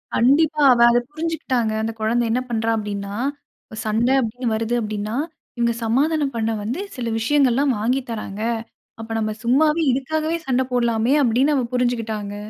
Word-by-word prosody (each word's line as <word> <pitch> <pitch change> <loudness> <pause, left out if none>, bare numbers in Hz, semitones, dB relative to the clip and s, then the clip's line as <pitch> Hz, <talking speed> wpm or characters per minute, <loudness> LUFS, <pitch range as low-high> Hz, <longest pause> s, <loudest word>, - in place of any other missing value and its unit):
கண்டிப்பா. 300 +5 +3
அவ 235 - +1
அத 240 - +4
புரிஞ்சுகிட்டாங்க. 295 -8 -1
அந்த 225 +1 -2
குழந்த 235 +2 +1
என்ன 250 +2 +1
பண்றா, 225 -1 -1
அப்படின்னா, 200 -1 -4 0.7
சண்ட 220 +3 +1
அப்படின்னு 245 +2 -3
வருது 225 +2 -1
அப்படின்னா, 215 0 -3 0.4
இவங்க 235 0 +1
சமாதானம் 285 +4 +1
பண்ண 225 0 0
வந்து 235 - -3 0.2
சில 235 -3 -3
விஷயங்கள்லாம் 270 +2 +2
வாங்கி 250 +5 +1
தர்றாங்க. 215 -2 -5 0.6
அப்ப 225 - -9
நம்ம 215 -1 -1
சும்மாவே, 300 +7 +3
இதுக்காகவே 310 +5 -1
சண்ட 260 -1 +2
போடலாமே, 235 0 +2
அப்படின்னு 260 +5 +2
அவ 260 - +1
புரிஞ்சுக்கிட்டாங்க! 225 -5 -1
240 Hz, 145 wpm, -21 LUFS, 220-270 Hz, 0.7 s, அத